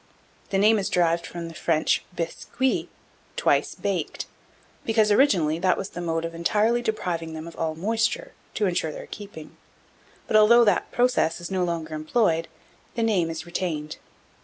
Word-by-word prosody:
The 195 - 0
name 210 +2 +5
is 195 - -2
derived 170 -1 +1
from 170 -1 -6
the 165 - -9
French 160 -1 +1
bis 165 -1 -4
cuit, 260 +1 +1 0.5
"twice - - +1
baked," - - -3 0.6
because, 220 -2 +2
originally, 180 - +3
that 185 0 +2
was 195 - -4
the 175 - -7
mode 165 -1 -1
of 165 - -5
entirely 215 +8 +1
depriving 175 -8 -2
them 160 +1 -7
of 170 - -10
all 160 -1 -2
moisture, 225 +6 -1 0.2
to 215 - +1
insure 175 -4 0
their - - -8
keeping; 200 -7 -10 0.7
but, - - -1
although 225 +3 +7
that 205 -5 +1
process 245 -9 +2
is 175 +2 -7
no 185 -1 +1
longer 165 -2 -3
employed, 165 +1 +1 0.5
the 230 - 0
name 190 -7 +2
is 165 0 -5
retained. 160 -3 -3
175 Hz, 165 wpm, -25 LUFS, 165-215 Hz, 0.7 s, although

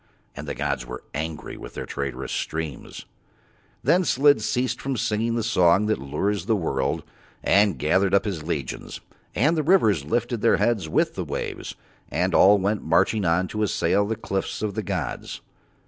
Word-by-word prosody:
And 70 +2 -7
the 70 - -3
gods 70 -3 -2
were 60 +1 -8
angry 80 +1 -5
with - - -10
Their - - -4
traitorous 65 -2 -4
streams. 80 -5 -4 0.8
Then 185 +1 +4
Slid 145 -1 +4
ceased 125 0 -1
from 135 -2 -2
singing 115 0 0
the 115 - -1
song 95 -2 +3
that 110 0 0
lures 85 +10 -2
the 115 - +3
world, 70 -8 -1 0.4
and 100 -2 +3
gathered 95 +5 +2
up 100 - +2
his 95 -7 -3
legions, 75 -5 -4 0.4
and 150 +9 +3
the 155 - +1
rivers 135 - +3
lifted 120 - -1
up - - -13
their 115 - +4
heads 105 -9 0
with - - +1
the - - -3
waves, - - -5 0.3
and 90 +4 0
all 100 +2 +7
went 100 +1 0
marching 90 +6 +2
on 85 +3 +2
to 110 - -3
assail 100 0 +1
the 110 - -1
cliffs 95 0 -3
of 105 -2 -1
the 110 - -2
gods. 95 - -4
100 Hz, 180 wpm, -24 LUFS, 80-110 Hz, 0.8 s, all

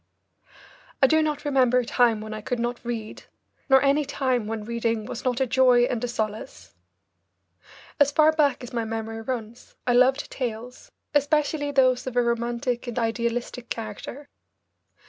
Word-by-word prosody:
I - - +10
do 315 +4 +4
not 300 -1 -2
remember 260 -3 +3
a 250 - +1
time 230 -3 +2
when 215 0 -6
I 215 - -6
could 250 +3 -3
not 240 +1 -3
read, 230 -3 -6 0.4
nor 265 0 +6
any 280 +2 +3
time 260 -5 -1
when 220 -1 -4
reading 230 -1 -1
was 235 - -6
not 250 -1 0
a 265 - +2
joy 250 -1 +4
and 245 -1 -1
a - - 0
solace. 215 - -5 1.3
As 285 -1 +5
far 310 +1 +5
back 290 -5 +1
as 245 +1 -9
my 230 -1 -1
memory 225 0 -5
runs 230 -1 -6
I 245 - +2
loved 260 +3 +3
tales, 245 0 -6 0.2
especially 290 0 +1
those 255 -3 +2
of 255 - -4
a 245 - +3
romantic 235 +1 -2
and 240 - -5
idealistic 235 +1 -2
character. 225 +6 -6
245 Hz, 165 wpm, -25 LUFS, 230-265 Hz, 1.3 s, I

